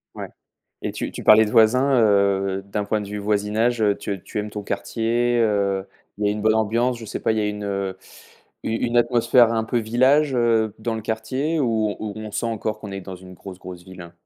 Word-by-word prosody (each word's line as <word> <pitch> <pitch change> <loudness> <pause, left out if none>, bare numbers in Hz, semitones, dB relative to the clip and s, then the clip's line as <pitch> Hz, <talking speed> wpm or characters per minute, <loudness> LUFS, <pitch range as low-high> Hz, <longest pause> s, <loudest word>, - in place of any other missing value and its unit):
Ouais, - - -6 0.6
et - - -3
tu - - -4
tu - - -8
parlais 110 +1 +7
de - - -4
voisins, 125 +4 +4
heu, 100 -2 +2
d'un 100 +1 -3
point 110 +1 -1
de 100 - -7
vue 105 0 -5
voisinage, 105 +3 0
heu, 105 -2 +2
tu 100 -3 -5
tu - - -6
aimes 105 0 -3
ton 105 0 -6
quartier, 120 +3 -1
heu, 100 -3 +1 0.3
il 105 - 0
y - - +3
a - - +2
une 105 0 -5
bonne 110 0 +3
ambiance? 115 +3 +1
Je 115 - -9
sais - - -5
pas, - - +1
il 110 - -1
y - - +1
a 105 - 0
une, 105 0 -5
heu, 100 -1 -3 0.7
u - - -2
une 120 +1 -1
atmosphère 120 0 +4
un 110 -1 0
peu 120 +1 -1
village, 130 +6 +2
heu, 115 -3 +2
dans 115 +1 -3
le 110 - -4
quartier, 130 +9 -2
ou 110 -5 0
ou 105 -1 -5
on 110 -1 -7
sent 115 - -2
encore 110 -1 -3
qu'on 100 -2 -8
est 95 - -5
dans 95 0 -8
une 95 0 -13
grosse 95 0 -10
grosse 90 -2 -10
ville, 95 -1 -11
hein? 85 0 -12
110 Hz, 240 wpm, -22 LUFS, 100-115 Hz, 0.7 s, parlais